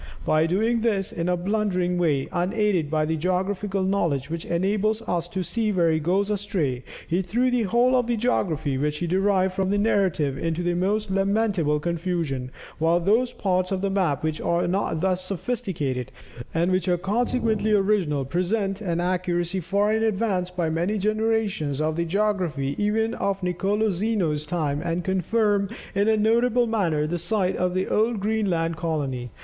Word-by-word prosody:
By 155 +1 +3
doing 220 +7 +1
this 205 -5 0
in 170 +1 -2
a 180 - +1
blundering 180 -2 0
way, 145 -6 +1
unaided 185 -3 0
by 155 0 +1
the 160 +1 -1
geographical 190 +3 -1
knowledge 165 -8 0
which 165 0 -4
enables 210 +5 0
us 175 -4 -2
to 185 +1 -3
see 220 +3 -1
where 170 -4 +2
he 160 - +1
goes 190 +6 +1
astray, 180 - -1 0.2
he 175 +3 +1
threw 240 +8 0
the 245 -1 +2
whole 240 +5 +3
of 250 -2 +2
the 240 -1 0
geography 160 - 0
which 150 +1 -1
he 175 - -2
derived 190 +1 +2
from 190 0 -1
the 205 - +1
narrative 185 -10 +1
into 165 +1 -1
the 175 0 +1
most 200 +4 0
lamentable 195 -6 +1
confusion, 165 -6 -2 0.3
while 165 +2 +3
those 225 +8 +2
parts 185 -4 -1
of 190 -1 -1
the 195 0 0
map 175 -9 0
which 155 -1 -2
are 170 +1 +1
not 175 -3 -1
thus 185 0 0
sophisticated, 175 - -3 0.4
and 170 +3 +1
which 185 -1 0
are 180 -1 +2
consequently 220 +2 0
original, 195 -9 +2
present 195 +6 -1
an 170 -4 -1
accuracy 175 0 -1
far 200 +4 +1
in 220 - +1
advance 200 -4 0
by 180 -2 -2
many 170 +7 0
generations 215 -8 0
of 155 0 0
the 170 +1 -1
geography 175 -7 0
even 220 +2 +1
of 195 -1 -2
Nicolo 200 +4 0
Zeno's 175 -6 -1
time, 150 -3 -1
and 170 +1 -2
confirm 200 +2 +1 0.2
in 200 +2 +1
a 220 0 +4
notable 235 +3 +3
manner 175 -10 0
the 170 +3 -2
site 185 +2 0
of 180 0 -1
the 185 - 0
old 220 0 +1
Greenland 195 -6 0
colony. 140 -7 -2
185 Hz, 175 wpm, -24 LUFS, 165-210 Hz, 0.4 s, a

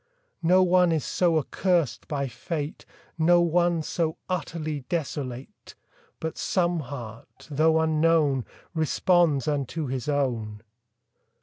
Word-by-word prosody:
No 180 +3 +5
one 180 -1 +4
is 160 -3 0
so 170 -3 +2
accursed 170 0 0
by 140 -2 -2
fate, 145 +5 -5 0.3
No 175 +2 +5
one 170 -1 +2
so 160 0 -1
utterly 160 -4 -3
desolate, 140 -6 -5 0.4
But 160 0 -4
some 175 -2 +1
heart, 120 -5 -9
though 160 +2 +3
unknown, 155 -4 +2 0.3
Responds 160 -2 +2
unto 145 +2 -1
his 130 +1 -3
own. 115 -7 -1
155 Hz, 110 wpm, -26 LUFS, 140-170 Hz, 0.4 s, No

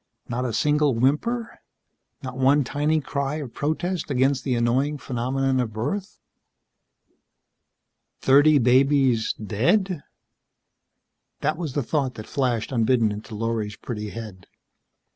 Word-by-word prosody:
Not 125 +2 -2
a 120 - -1
single 150 +1 +2
whimper. 220 - 0 0.6
Not 130 -1 -6
one 135 +3 +3
tiny 150 +4 0
cry 140 +1 -2
of 145 -6 -6
protest 165 +3 -2
against 135 0 +1
the 130 -3 0
annoying 130 +5 +1
phenomenon 130 +1 -1
of 115 -3 -2
birth. 150 - -3 2.0
Thirty 145 +3 +5
babies 130 -2 +3
dead? 170 - 0 1.4
That 155 - +1
was 160 -5 -5
the 145 - -1
thought 135 -1 -1
that 110 - -8
flashed, 125 -4 -1
unbidden, 115 -2 +2
into 105 +2 -7
Lorry's 110 -1 -2
pretty 105 -3 -6
head. 105 -5 -9
130 Hz, 120 wpm, -24 LUFS, 115-145 Hz, 2.0 s, Thirty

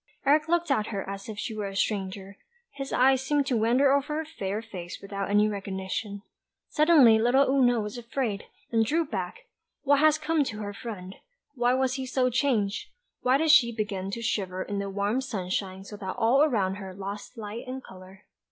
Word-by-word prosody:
Eric 300 +3 +4
looked 345 -2 +1
at 215 -6 +1
her 200 -3 -4
as 195 +2 -6
if 215 - -6
she 220 - -4
were 210 -2 -3
a 195 - -7
stranger; 195 -1 -2 0.4
his 275 -1 -6
eyes 265 +1 +4
seemed 285 +1 +1
to 265 - 0
wander 245 +5 +3
over 280 +2 +1
her 320 - -2
fair 205 -10 -4
face 185 -6 -8
without 200 0 -5
any 210 +1 +4
recognition. 200 0 -4 0.5
Suddenly 295 -8 +6
little 255 +5 +4
Oona 250 -3 +3
was 210 +3 -4
afraid, 230 -3 -3 0.3
and 225 -1 +3
drew 320 +8 +1
back; 460 - -5 0.4
what 285 0 +4
had 310 0 +4
come 310 0 +1
to 225 -4 -5
her 205 0 -5
friend? 200 -4 -8 0.4
Why 245 -1 +2
was 260 -1 +1
he 260 -1 -4
so 255 0 +1
changed? 230 -6 0 0.3
Why 255 +2 +3
did 315 +1 +3
she 265 -6 +6
begin 205 -4 -3
to 230 +4 -5
shiver 185 -4 -1
in 200 -1 -4
the 200 0 -3
warm 205 +5 0
sunshine 190 -5 -3
so 210 +1 -9
that 190 -2 -5
all 245 +4 +3
around 205 -10 +2
her 190 -2 -8
lost 200 +5 -7
light 220 +3 -7
and 260 +1 -6
colour? 190 +1 -14
225 Hz, 195 wpm, -27 LUFS, 200-265 Hz, 0.5 s, Suddenly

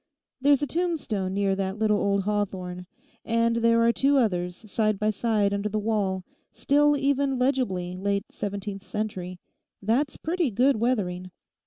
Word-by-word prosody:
There's 285 +1 +4
a - - +3
tombstone 280 - -2
near 195 -1 +1
that 190 +1 -2
little 210 -1 +2
old 200 -1 +1
hawthorn, 185 -3 -3 0.4
and 230 0 +1
there 230 0 +3
are 230 - +5
two 275 +3 +3
others 180 -7 0 0.2
side 215 -2 +1
by 215 +2 +1
side 210 -2 +1
under 200 +1 -1
the 215 - -2
wall, 205 -3 -1 0.3
still 295 +1 +3
even 275 -1 +1
legibly 245 -9 0
late 200 +2 -1
seventeenth 200 -1 -5
century. 185 -4 -4 0.4
That's 245 +8 0
pretty 335 -2 0
good 250 +4 +3
weathering. 190 -6 -1
215 Hz, 150 wpm, -26 LUFS, 195-255 Hz, 0.4 s, are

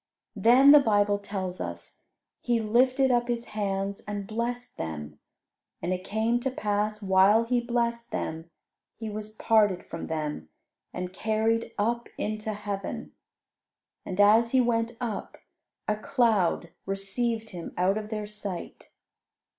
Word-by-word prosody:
Then, 255 +5 +7
the 295 - +10
Bible 205 -5 +2
tells 190 -3 -4
us, - - -7 0.4
"He 240 -1 +1
lifted 255 +4 +3
up 240 -1 +2
His 240 -1 -2
hands 200 -1 -2
and 205 -1 -4
blessed 240 +3 -3
them. 75 -2 -6 0.6
And 180 - -1
it 185 0 -4
came 220 +4 0
to 265 +2 -1
pass, 210 -3 -1
while 195 +3 +5
He 240 +1 +1
blessed 235 -1 -1
them, 160 +1 -4 0.5
He 220 -1 -6
was 215 +1 -7
parted 210 -5 +3
from 165 - -6
them, 150 - -3 0.4
and 180 0 -5
carried 220 +3 0
up 235 +3 0
into 215 +1 -2
heaven." 205 -1 -5 0.9
And 185 +1 -6
as 220 +4 +5
He 260 - +5
went 235 -1 +1
up, 235 -5 -4 0.5
a 210 - +1
cloud 215 -8 +1 0.2
received 220 +4 -2
Him 175 -2 -7
out 190 +4 +2
of 210 0 -8
their 215 -1 -3
sight. 205 -4 -7
215 Hz, 140 wpm, -27 LUFS, 195-235 Hz, 0.9 s, the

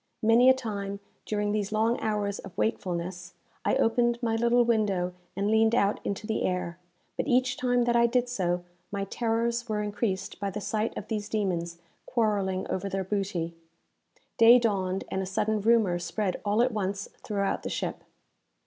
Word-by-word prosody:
Many 230 +3 +6
a - - +8
time, 200 -5 -4 0.3
during 210 -1 0
these 210 -1 -1
long 225 +2 +1
hours 205 -2 -1
of 180 - -11
wakefulness, 170 - -2 0.3
I - - +2
opened 235 +1 +2
my 225 -1 +1
little 235 +1 +3
window 200 -6 +1 0.2
and 200 +1 0
leaned 220 +1 +4
out 200 -3 +2
into 200 +1 -3
the 220 0 -1
air; 180 -1 -2 0.4
but - - -1
each 250 0 +2
time 245 -3 +2
that 240 0 +1
I 235 0 +5
did 250 +1 +1
so, 180 -7 -1 0.3
my 200 -1 -2
terrors 235 +3 -1
were 210 -1 0
increased 205 -2 -2
by 200 -1 -1
the 200 +2 -4
sight 215 +1 -2
of 205 - -6
these 210 -2 -3
demons 175 -5 -1 0.3
quarrelling 200 -5 0
over 195 +2 -2
their 195 0 -2
booty. 190 -4 -2 0.9
Day 230 +2 +9
dawned, 195 -5 0
and 190 - -1
a 190 - -3
sudden 215 +2 0
rumour 215 -5 +3
spread 180 +3 -2
all 210 +3 +3
at 255 - +1
once 200 -2 -2 0.2
throughout 200 -2 -1
the - - -4
ship. - - -3
210 Hz, 175 wpm, -28 LUFS, 190-230 Hz, 0.9 s, Day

